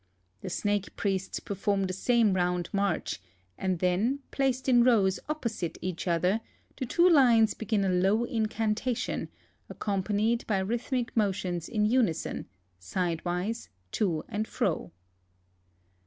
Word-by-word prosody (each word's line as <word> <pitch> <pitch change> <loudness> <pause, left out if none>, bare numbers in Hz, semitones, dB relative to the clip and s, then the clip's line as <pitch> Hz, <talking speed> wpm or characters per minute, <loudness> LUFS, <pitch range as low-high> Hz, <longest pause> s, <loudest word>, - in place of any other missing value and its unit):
The - - -5
snake 205 +2 -1
priests 195 -1 -1
i)erform 200 0 -1
the 185 - -3
same 225 +1 +3
round 180 -1 0
march, 200 - -1 0.3
and 185 - -1
then, 195 +11 +1
placed 265 -1 0
in 245 -2 +6
rows 205 -6 +3
opposite 235 - -3
each 185 0 -4
other, 180 +5 +2 0.3
the 255 - -4
two 345 +8 +4
lines 240 -9 +5
begin 215 -3 0
a - - +2
low 190 +5 +3
incantation, 225 0 -1 0.4
ac - - -9
companied 210 +3 0
by 210 - +1
rhythmic 235 +5 -2
motions 185 -5 0
in 210 -3 +1
unison, 220 -7 0 0.3
sidewise, 180 - -2 0.2
t(» 170 -7 0
and 215 0 -2
fro. 160 - -1
205 Hz, 125 wpm, -29 LUFS, 185-235 Hz, 0.4 s, in